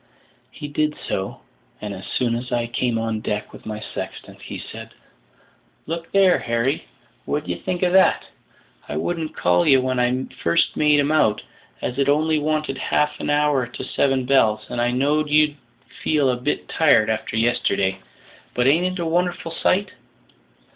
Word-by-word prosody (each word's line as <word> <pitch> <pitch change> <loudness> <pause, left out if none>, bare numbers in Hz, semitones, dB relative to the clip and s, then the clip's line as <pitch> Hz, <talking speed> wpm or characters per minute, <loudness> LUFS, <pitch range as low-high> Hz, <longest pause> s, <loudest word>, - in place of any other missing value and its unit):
He 145 - -8
did 150 +1 -1
so, 95 0 -3 0.4
and 105 -1 -5
as 95 0 -9
soon 120 -2 0
as 125 +2 -5
I 120 -1 0
came 120 0 -1
on 115 -1 -2
deck 105 -1 -4
with - - -12
my 105 -1 -4
sextant, - - -7
he - - -7
said, - - -9 0.9
"Look 165 +1 -5
there, 195 -2 +4
Harry, 115 +5 -1 0.4
what - - -2
d'ye 90 -1 -3
think 180 0 -3
of 180 0 +2
that? 190 0 +4 0.6
I 75 - -3
wouldn't 160 - -3
call 90 0 +2
ye 135 - +7
when 130 -1 0
I 125 +1 +1 0.2
first 85 - +2
made 150 -1 +4
'em 145 +1 +1
out, 110 -9 +2 0.4
as 125 +2 -3
it 140 0 +2
only 155 +2 +2
wanted 155 -2 -1
half 150 0 0
an - - -3
hour 145 -3 +2
to 120 - -8
seven 135 -2 0
bells, 110 -5 +3
and 120 - -1
I 120 - +2
knowed 145 +4 +1
you'd 150 0 +4 0.5
feel 145 -4 +2
a - - 0
bit 125 +4 -2
tired 145 -9 +4
after 110 0 -3
yesterday. 100 -5 +1 0.6
But 125 - +1
ain't 160 +7 +4
it 185 0 -3
a 170 - -2
wonderful 175 0 -1
sight?" 195 +4 +1
135 Hz, 175 wpm, -22 LUFS, 115-155 Hz, 0.9 s, ye